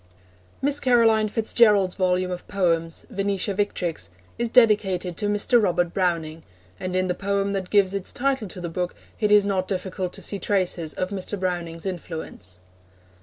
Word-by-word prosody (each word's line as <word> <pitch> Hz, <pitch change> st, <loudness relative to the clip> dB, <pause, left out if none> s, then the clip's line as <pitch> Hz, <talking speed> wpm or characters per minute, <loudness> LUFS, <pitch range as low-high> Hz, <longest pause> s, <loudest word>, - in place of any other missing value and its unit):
Miss 285 Hz, +1 st, +3 dB
Caroline 225 Hz, -4 st, +4 dB
Fitz 225 Hz, +1 st, -2 dB
Gerald's 205 Hz, -6 st, +5 dB
volume 185 Hz, 0 st, 0 dB
of 180 Hz, 0 st, -6 dB
poems, 165 Hz, -4 st, 0 dB
Venetia 200 Hz, 0 st, -1 dB
Victrix, 175 Hz, -, -2 dB, 0.3 s
is 235 Hz, 0 st, 0 dB
dedicated 205 Hz, -7 st, +3 dB
to 210 Hz, -, 0 dB
Mr. 205 Hz, +4 st, +3 dB
Robert 175 Hz, -3 st, +1 dB
Browning, 165 Hz, -4 st, -1 dB, 0.4 s
and 185 Hz, 0 st, -4 dB
in 185 Hz, 0 st, +2 dB
the 180 Hz, -, 0 dB
poem 200 Hz, +1 st, -1 dB
that 190 Hz, -2 st, -3 dB
gives 200 Hz, -2 st, +3 dB
its 195 Hz, -2 st, -3 dB
title 265 Hz, -4 st, -1 dB
to 185 Hz, -, -9 dB
the 175 Hz, -, -4 dB
book 180 Hz, +1 st, -3 dB, 0.2 s
it 210 Hz, -, +2 dB
is 205 Hz, -1 st, +6 dB
not 190 Hz, -2 st, 0 dB
difficult 185 Hz, -1 st, -3 dB
to -, -, -5 dB
see 200 Hz, -, -2 dB
traces 180 Hz, -6 st, -1 dB
of 185 Hz, -, -2 dB
Mr. 200 Hz, 0 st, -4 dB
Browning's 175 Hz, -2 st, -3 dB
influence. 160 Hz, -, -6 dB
190 Hz, 170 wpm, -24 LUFS, 180-205 Hz, 0.4 s, is